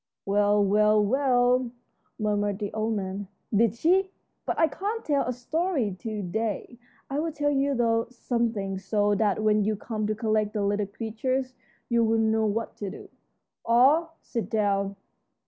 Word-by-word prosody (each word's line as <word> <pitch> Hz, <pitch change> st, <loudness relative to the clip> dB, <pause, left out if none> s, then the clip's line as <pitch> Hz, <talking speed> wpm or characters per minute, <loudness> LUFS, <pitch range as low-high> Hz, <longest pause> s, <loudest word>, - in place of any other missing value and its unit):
"Well, 205 Hz, +1 st, +3 dB
well, 210 Hz, +2 st, +4 dB
well," 250 Hz, 0 st, +2 dB, 0.5 s
murmured 205 Hz, -2 st, 0 dB
the 205 Hz, -1 st, -4 dB
old 220 Hz, +1 st, -1 dB
man, 195 Hz, 0 st, -4 dB, 0.3 s
"did 220 Hz, 0 st, +3 dB
she? 370 Hz, +9 st, +2 dB, 0.4 s
But -, -, -1 dB
I 325 Hz, -, +4 dB
can't 425 Hz, +7 st, -4 dB
tell 280 Hz, -5 st, +1 dB
a -, -, 0 dB
story 260 Hz, -, -1 dB
to 215 Hz, -2 st, -4 dB
day. 220 Hz, +5 st, -3 dB, 0.3 s
I'll 305 Hz, +4 st, -1 dB
tell 290 Hz, -1 st, 0 dB
you, 280 Hz, 0 st, +1 dB
though, 230 Hz, -1 st, +1 dB
something, 230 Hz, -6 st, -2 dB
so 205 Hz, +1 st, +1 dB
that 205 Hz, +1 st, +1 dB
when 215 Hz, -1 st, +3 dB
you 215 Hz, +1 st, 0 dB
come 215 Hz, 0 st, -3 dB
to 215 Hz, -, -1 dB
collect 215 Hz, -1 st, 0 dB
the 210 Hz, -2 st, -1 dB
little 205 Hz, 0 st, 0 dB
creatures 255 Hz, +5 st, -3 dB, 0.3 s
you'll 230 Hz, -1 st, +2 dB
know 220 Hz, 0 st, +2 dB
what 225 Hz, +2 st, -3 dB
to 205 Hz, -, -4 dB
do. -, -, -10 dB, 0.5 s
All 295 Hz, +8 st, +3 dB
sit 230 Hz, -3 st, -4 dB
down." 200 Hz, -2 st, 0 dB
220 Hz, 155 wpm, -26 LUFS, 205-250 Hz, 0.5 s, well